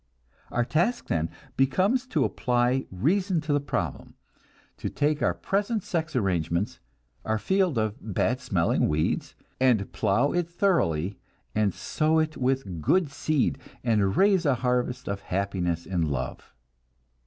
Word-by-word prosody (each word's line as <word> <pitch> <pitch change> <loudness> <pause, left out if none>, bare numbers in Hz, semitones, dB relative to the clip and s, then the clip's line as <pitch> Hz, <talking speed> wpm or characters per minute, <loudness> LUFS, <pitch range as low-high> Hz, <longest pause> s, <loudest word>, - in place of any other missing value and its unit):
Our 120 0 0
task 175 - 0
then 80 0 0 0.3
becomes 190 - +2
to 155 - +1
apply 125 +1 +1
reason 175 - +1
to 150 -1 -1
the 145 - +3
problem; 125 - -4 0.6
to - - -3
take 150 +1 0
our - - +2
present 205 +1 -1
sex 160 -4 -2
arrangements, 90 -3 0 0.4
our 110 0 0
field 185 - +1
of 110 -1 0
bad 105 -4 0
smelling - - +1
weeds, 75 +1 -1 0.2
and 125 -6 +2
plow 120 +9 +2
it 175 -1 0
thoroughly, 100 - +1 0.3
and 105 -2 +2
sow 155 - 0
it 155 -1 +1
with 125 -10 -1
good 170 - +2
seed, 145 -1 0 0.2
and 105 -5 +2
raise 195 -2 +4
a 140 -5 +3
harvest 125 +1 0
of 100 0 -2
happiness 90 -3 -2
in 85 -5 0
love. 70 -4 -4
125 Hz, 140 wpm, -27 LUFS, 100-160 Hz, 0.6 s, raise